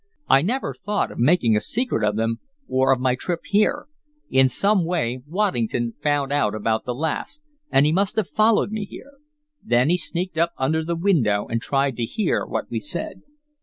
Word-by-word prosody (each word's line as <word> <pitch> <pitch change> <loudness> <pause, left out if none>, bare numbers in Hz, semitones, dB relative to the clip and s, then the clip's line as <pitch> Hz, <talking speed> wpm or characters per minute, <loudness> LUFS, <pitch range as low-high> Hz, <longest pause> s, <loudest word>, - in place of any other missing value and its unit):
I 135 - +5
never 240 - -1
thought 205 0 -2
of - - -9
making 120 -4 +3
a 105 - +1
secret 240 - -1
of 105 -1 +1
them, 115 +1 -1 0.3
or 130 +1 +2
of 130 - +3
my 130 0 +2
trip 170 +6 -3
here. 205 +1 +1 0.5
In 130 0 +5
some 200 - +2
way 155 -8 -1
Waddington 120 - -1
found 145 -2 0
out 105 -7 +1
about 110 +1 -1
the 125 - -3
last, 160 - -3 0.3
and 135 - +4
he 150 - +3
must 195 +4 +1
have 220 -5 0
followed 215 -1 +2
me 215 -1 -3
here. 275 +7 -12 0.5
Then 120 +4 +2
he 180 - +3
sneaked 175 0 -3
up 170 +1 +2
under 155 +5 0
the 170 +1 -2
window, 145 - +2
and 115 0 -2
tried 135 -1 0
to 120 - -1
hear 210 - -1
what - - -4
we - - -1
said." - - -5
145 Hz, 195 wpm, -23 LUFS, 120-185 Hz, 0.5 s, I